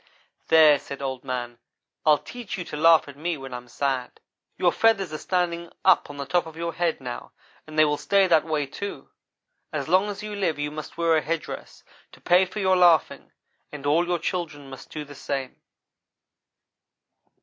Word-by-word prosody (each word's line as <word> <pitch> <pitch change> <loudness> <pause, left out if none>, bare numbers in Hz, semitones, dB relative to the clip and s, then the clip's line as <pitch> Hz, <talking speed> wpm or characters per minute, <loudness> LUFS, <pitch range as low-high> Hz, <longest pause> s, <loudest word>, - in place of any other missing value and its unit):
"'There,' 155 -3 +7
said 140 - -8
Old 130 -2 -4
man, 120 -2 -4 0.5
'I'll 150 -1 +7
teach 240 +2 -7
you 180 - -4
to 150 - -8
laugh 165 +1 +5
at 140 - -10
me 165 +3 -3
when 135 -2 -9
I'm 125 0 -7
sad. 130 0 -2 0.4
Your - - +3
feathers 200 -7 +2
are 155 - -4
standing 170 -2 -1
up 185 -6 +5
on 145 - -9
the 140 - -4
top 175 +4 0
of 160 0 -11
your 170 0 -3
head 170 -1 0
now 125 -2 -7 0.3
and 155 0 -9
they 155 - +7
will 150 -1 0
stay 200 -1 +3
that 165 -4 +4
way, 155 -2 -1
too. 200 +9 -7 0.6
As 140 -4 -3
long 185 +5 +3
as 205 0 -6
you 210 -1 -5
live 190 -6 0
you 145 0 -3
must 155 +1 -8
wear 165 -1 +3
a - - +1
head 160 +3 -2
dress, - - -9 0.3
to - - -15
pay 180 +2 +4
for 185 +3 -7
your 190 -1 +3
laughing, 175 -4 +3 0.4
and 145 -2 -8
all 165 +4 +3
your 175 0 +1
children 155 -6 -4
must 135 - -11
do 150 -1 -6
the 145 - -11
same. 135 -1 -5
155 Hz, 195 wpm, -25 LUFS, 140-175 Hz, 0.6 s, There